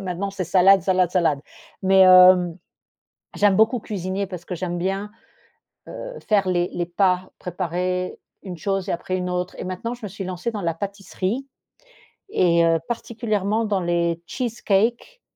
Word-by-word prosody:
Maintenant, 190 Hz, +1 st, -3 dB
c'est 195 Hz, -1 st, -4 dB
salade, 190 Hz, +3 st, +5 dB
salade, 185 Hz, -2 st, +2 dB
salade, 165 Hz, -6 st, +1 dB, 0.4 s
mais 190 Hz, 0 st, +4 dB
hem, 180 Hz, -2 st, +7 dB, 0.8 s
j'aime 205 Hz, -2 st, +3 dB
beaucoup 225 Hz, +3 st, +3 dB
cuisiner 195 Hz, -1 st, -3 dB
parce 180 Hz, -3 st, -8 dB
que 180 Hz, -, -4 dB
j'aime 175 Hz, 0 st, -3 dB
bien, 195 Hz, +3 st, -2 dB, 0.8 s
heu, -, -, -8 dB
faire 200 Hz, -3 st, +3 dB
les 175 Hz, -1 st, 0 dB
les 175 Hz, -1 st, -2 dB
pas 185 Hz, +1 st, +1 dB
préparés 180 Hz, +1 st, -3 dB, 0.3 s
une 180 Hz, -3 st, -7 dB
chose 195 Hz, +1 st, -2 dB
et -, -, 0 dB
après 185 Hz, +2 st, -3 dB
une 180 Hz, 0 st, -3 dB
autre 180 Hz, 0 st, -3 dB
et -, -, -5 dB
maintenant 185 Hz, +6 st, -4 dB
je 240 Hz, -2 st, -12 dB
me -, -, -5 dB
suis 195 Hz, +1 st, -7 dB
lancée 180 Hz, +4 st, -3 dB
dans 210 Hz, -, -4 dB
la 165 Hz, -1 st, -1 dB
pâtisserie 200 Hz, +6 st, -4 dB, 0.8 s
et 170 Hz, -, +3 dB
heu, 165 Hz, 0 st, +3 dB
particulièrement 225 Hz, -2 st, -1 dB
dans 205 Hz, -2 st, 0 dB
les 170 Hz, -1 st, 0 dB
cheesecakes 235 Hz, -, -1 dB
185 Hz, 160 wpm, -22 LUFS, 180-205 Hz, 0.8 s, hem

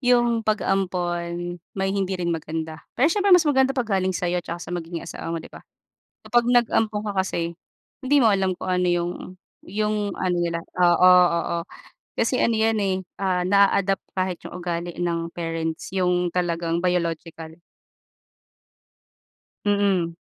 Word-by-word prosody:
yung 240 Hz, -2 st, +3 dB
pag-ampon 175 Hz, -4 st, -1 dB, 0.2 s
may 195 Hz, 0 st, 0 dB
hindi 195 Hz, -1 st, -1 dB
rin 170 Hz, -1 st, -1 dB
maganda 160 Hz, 0 st, -5 dB, 0.2 s
pero 250 Hz, -, +3 dB
siyempre 400 Hz, -3 st, +5 dB
mas 335 Hz, -, +2 dB
maganda 270 Hz, -2 st, +2 dB
pag 250 Hz, -, +1 dB, 0.2 s
galing 185 Hz, 0 st, -1 dB
sayo 180 Hz, 0 st, -1 dB
'tsaka 170 Hz, 0 st, -6 dB
sa 175 Hz, 0 st, -8 dB
magiging 170 Hz, -1 st, -5 dB
asawa 165 Hz, -, -7 dB
mo 165 Hz, -, -2 dB
'di 160 Hz, -, -9 dB
ba? -, -, -11 dB, 0.6 s
Kapag 240 Hz, 0 st, +2 dB
nag-ampon 225 Hz, -3 st, +2 dB
ka 205 Hz, -, -2 dB
kasi 170 Hz, -3 st, -2 dB, 0.5 s
hindi 280 Hz, +1 st, +2 dB
mo 220 Hz, -, +5 dB
alam 190 Hz, -2 st, +1 dB
kung -, -, -6 dB
ano 180 Hz, 0 st, +1 dB
yung, 175 Hz, 0 st, 0 dB, 0.6 s
yung 210 Hz, +1 st, -1 dB
ano 180 Hz, -1 st, 0 dB
nila 170 Hz, -1 st, -1 dB, 0.2 s
oo, 180 Hz, +1 st, +6 dB, 0.2 s
oo 170 Hz, 0 st, -1 dB, 0.6 s
kasi 235 Hz, +3 st, +1 dB
ano 230 Hz, -, +2 dB
yan, 220 Hz, 0 st, +2 dB
eh, 195 Hz, -2 st, +1 dB, 0.2 s
ah, 185 Hz, -2 st, 0 dB
naa-adopt 200 Hz, 0 st, +3 dB
kahit 185 Hz, -2 st, -1 dB
yung -, -, -10 dB
ugali 175 Hz, -1 st, -4 dB
ng 170 Hz, -1 st, -1 dB
parents, 165 Hz, -1 st, -4 dB
yung 180 Hz, -2 st, +1 dB
talagang 170 Hz, -1 st, -1 dB
biological. 165 Hz, -2 st, -2 dB, 2.0 s
Mm. 200 Hz, -5 st, +1 dB
180 Hz, 150 wpm, -24 LUFS, 170-205 Hz, 2.0 s, oo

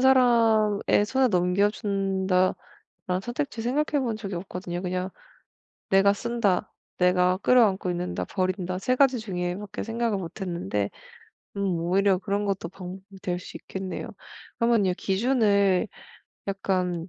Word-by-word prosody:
사람의 230 Hz, -6 st, +4 dB
손에 260 Hz, +3 st, +2 dB
넘겨준다.'라는 190 Hz, -1 st, +1 dB, 0.5 s
선택지 240 Hz, -1 st, -3 dB
생각해 290 Hz, +3 st, 0 dB
본 230 Hz, -4 st, -1 dB
적이 200 Hz, -3 st, -5 dB
없거든요. 180 Hz, -1 st, -5 dB
그냥 185 Hz, 0 st, -2 dB, 0.8 s
'내가 195 Hz, +1 st, +5 dB
쓴다, 220 Hz, -4 st, 0 dB, 0.3 s
내가 180 Hz, 0 st, +3 dB
끌어안고 205 Hz, -5 st, +3 dB
있는다, 175 Hz, 0 st, -2 dB
버린다.' 185 Hz, -1 st, -2 dB
3 255 Hz, +6 st, +1 dB
가지 265 Hz, -2 st, +4 dB
중에 180 Hz, -5 st, -3 dB
밖에 205 Hz, 0 st, -6 dB
생각을 230 Hz, -2 st, -1 dB
못 180 Hz, +3 st, -7 dB
했는데 105 Hz, -, -2 dB, 0.7 s
음 200 Hz, -, -1 dB, 0.2 s
오히려 190 Hz, +3 st, +2 dB
그런 200 Hz, +1 st, -1 dB
것도 195 Hz, -4 st, -2 dB
방법이 190 Hz, +1 st, -10 dB
될 180 Hz, -1 st, -1 dB
수 180 Hz, -, -9 dB
있겠네요. 190 Hz, -1 st, -6 dB, 0.5 s
그러면요 230 Hz, -5 st, +3 dB
기준을 200 Hz, -2 st, +2 dB, 0.6 s
약간 185 Hz, -3 st, -1 dB
195 Hz, 285 characters per minute, -26 LUFS, 180-225 Hz, 0.8 s, 내가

